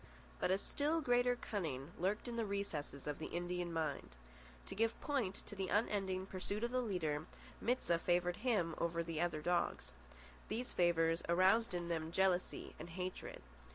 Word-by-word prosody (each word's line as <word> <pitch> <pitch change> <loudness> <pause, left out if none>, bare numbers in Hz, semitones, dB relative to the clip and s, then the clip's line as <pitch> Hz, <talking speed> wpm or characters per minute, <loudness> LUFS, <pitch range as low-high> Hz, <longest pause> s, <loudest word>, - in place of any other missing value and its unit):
But - - +1
a 190 - +4
still 295 +10 0
greater 245 -3 +3
cunning 160 - -3
lurked 195 +7 0
in 240 - -3
the 230 - +1
recesses 200 -9 -3
of 150 -1 -3
the 160 - -3
Indian 175 0 -2
mind. 155 - -2 0.5
To - - -6
give 225 +2 +1
point 250 -10 -1
to 195 -2 -3
unending 195 -3 +1
pursuit 200 +3 -3
of 240 - 0
the 255 0 +2
leader, 160 -8 -1 0.3
Mit 250 +3 +1
sah 170 -1 +2
favoured 175 +1 +2
him 210 -8 +1
over 170 0 +1
the 165 -1 -2
other 155 -3 0
dogs. 175 - +1 0.6
These 245 +2 -2
favours 165 -1 +3
aroused 190 +5 +4
in 175 -1 -2
them 165 -1 -1
jealousy 185 0 +1
and - - -7
hatred. 180 +2 -5
180 Hz, 165 wpm, -38 LUFS, 170-215 Hz, 0.6 s, a